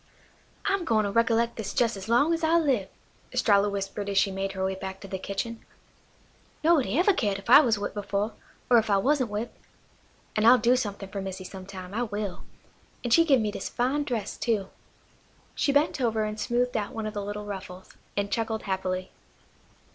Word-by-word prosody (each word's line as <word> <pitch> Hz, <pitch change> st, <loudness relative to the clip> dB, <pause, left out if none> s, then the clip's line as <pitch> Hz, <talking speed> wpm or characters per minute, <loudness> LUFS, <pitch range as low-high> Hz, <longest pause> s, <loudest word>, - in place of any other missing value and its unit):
"I'm 390 Hz, -2 st, +1 dB
gwine 225 Hz, -8 st, +2 dB
to 200 Hz, -, -1 dB
recollect 230 Hz, +1 st, +2 dB
this 210 Hz, -3 st, -2 dB
jes' 235 Hz, -2 st, +2 dB
as 195 Hz, +2 st, -8 dB
long 285 Hz, +8 st, +4 dB
as 330 Hz, 0 st, -2 dB
I 325 Hz, +1 st, +4 dB
live," 265 Hz, -, +1 dB, 0.4 s
Estralla 205 Hz, -1 st, +3 dB
whispered 200 Hz, 0 st, -4 dB
as 200 Hz, -, -1 dB
she 195 Hz, 0 st, +4 dB
made 195 Hz, 0 st, -3 dB
her 190 Hz, -1 st, -2 dB
way 190 Hz, -, 0 dB
back 190 Hz, 0 st, -6 dB
to 195 Hz, -, -8 dB
the 190 Hz, -1 st, -4 dB
kitchen. 225 Hz, +4 st, -4 dB, 1.0 s
"Nobuddy 305 Hz, -5 st, +3 dB
ever 380 Hz, +4 st, +4 dB
cared 205 Hz, -, 0 dB
if 200 Hz, +4 st, -5 dB
I 275 Hz, -, +11 dB
was 230 Hz, -6 st, +2 dB
whipped 205 Hz, -, -4 dB
before, 205 Hz, +1 st, -2 dB, 0.3 s
or 240 Hz, -2 st, +6 dB
if 220 Hz, -, -3 dB
I 200 Hz, -, +4 dB
wasn't 260 Hz, +2 st, +2 dB
whipped. 210 Hz, +3 st, -4 dB, 0.8 s
An' 215 Hz, -, +1 dB
I'll 240 Hz, +3 st, +8 dB
do 245 Hz, +2 st, +3 dB
somethin' 200 Hz, -5 st, -3 dB
fer 200 Hz, 0 st, -4 dB
Missy 190 Hz, -1 st, -5 dB
sometime, 185 Hz, 0 st, -9 dB
I 230 Hz, -, -1 dB
will. 205 Hz, -5 st, -4 dB, 0.6 s
An' 240 Hz, -, -2 dB
she 330 Hz, +7 st, +7 dB
give 275 Hz, -7 st, +4 dB
me 210 Hz, -1 st, -1 dB
dis -, -, -5 dB
fine 265 Hz, +5 st, 0 dB
dress 230 Hz, -7 st, -3 dB
too." 210 Hz, -5 st, -1 dB, 0.8 s
She 280 Hz, -, +1 dB
bent 285 Hz, 0 st, +2 dB
over 225 Hz, -3 st, +1 dB
and 215 Hz, 0 st, -4 dB
smoothed 245 Hz, +1 st, 0 dB
out 210 Hz, -2 st, -2 dB
one 225 Hz, -1 st, -4 dB
of 215 Hz, -, -4 dB
the 205 Hz, -2 st, -3 dB
little 205 Hz, +1 st, -5 dB
ruffles, 190 Hz, -2 st, -8 dB, 0.3 s
and 200 Hz, 0 st, -1 dB
chuckled 225 Hz, -1 st, -1 dB
happily. 185 Hz, -1 st, -2 dB
215 Hz, 200 wpm, -27 LUFS, 195-240 Hz, 1.0 s, I